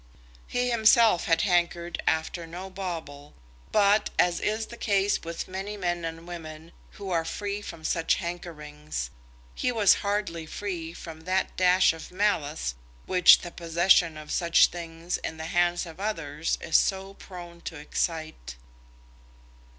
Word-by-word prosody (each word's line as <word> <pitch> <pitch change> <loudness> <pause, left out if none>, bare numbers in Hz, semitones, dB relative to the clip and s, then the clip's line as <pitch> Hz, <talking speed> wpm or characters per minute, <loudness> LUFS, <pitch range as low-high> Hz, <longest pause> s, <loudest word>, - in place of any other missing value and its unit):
He 245 0 0
himself 225 -4 +5
had 165 -1 +3
hankered 175 -2 0
after 160 +1 0
no 180 +3 -8
bauble, 165 -6 -6 0.4
but, 205 0 +4
as 175 -1 +3
is 215 +1 -1
the 235 - -10
case 200 -3 +1
with 165 0 -5
many 195 +3 -5
men 175 -3 -2
and 165 +1 -6
women 160 -1 -8 0.2
who 200 -3 -7
are 165 -2 +1
free 205 +4 -4
from 165 -5 -9
such 165 0 +1
hankerings, 150 - -6 0.4
he 250 - 0
was 215 -5 +5
hardly 200 -6 -2
free 175 -3 -4
from 165 -2 -10
that 185 +1 0
dash 185 -1 +4
of 165 - -10
malice 160 - 0 0.3
which 180 -2 +7
the 175 - -7
possession 170 -1 +3
of 155 0 -9
such 170 -1 +4
things 170 0 -5
in 160 - -6
the 160 - -5
hands 175 +1 +1
of 165 +1 -11
others 165 -7 -2
is 160 - +3
so 195 0 0
prone 175 -3 -11
to 165 - -6
excite. 155 - -3
175 Hz, 145 wpm, -27 LUFS, 165-195 Hz, 0.4 s, which